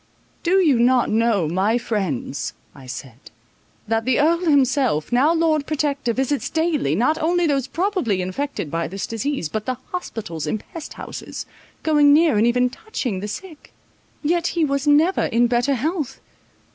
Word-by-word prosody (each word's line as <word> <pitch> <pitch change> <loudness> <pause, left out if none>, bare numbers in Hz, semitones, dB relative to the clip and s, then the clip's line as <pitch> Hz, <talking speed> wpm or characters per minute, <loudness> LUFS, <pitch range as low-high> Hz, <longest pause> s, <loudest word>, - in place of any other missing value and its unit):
"Do 350 - 0
you 305 -10 +4
not 245 +1 +3
know, 220 -6 +2
my 190 +8 +1
friends," 180 - -3 0.2
I 135 -2 -13
said, 125 0 -9 0.6
"that 225 +1 0
the 255 +1 +1
Earl 330 +3 +3
himself, 265 - +2
now 265 +6 +4
Lord 320 -3 +1
Protector, 285 -4 -1
visits 265 +4 -1
daily, 320 - 0
not 280 - +1
only 345 +2 +2
those 275 -4 +1
probably 340 - 0
infected 185 - -3
by 165 0 -1
this 195 +4 -4
disease, 230 - -2
but 215 +6 -4
the 255 -1 -1
hospitals 200 - -5
and 210 - -1
pest 325 - -9
houses, - - -7 0.4
going 295 -2 +5
near, 315 -4 +4
and 225 - +4
even 250 +1 +3
touching 255 - -4
the 205 - -4
sick? 315 - -9 0.5
yet 340 +3 +1
he 325 - +4
was 280 0 -1
never 310 +6 +4
in 235 +2 +2
better 245 +3 +1
health. 305 +2 -2
260 Hz, 160 wpm, -22 LUFS, 215-310 Hz, 0.6 s, going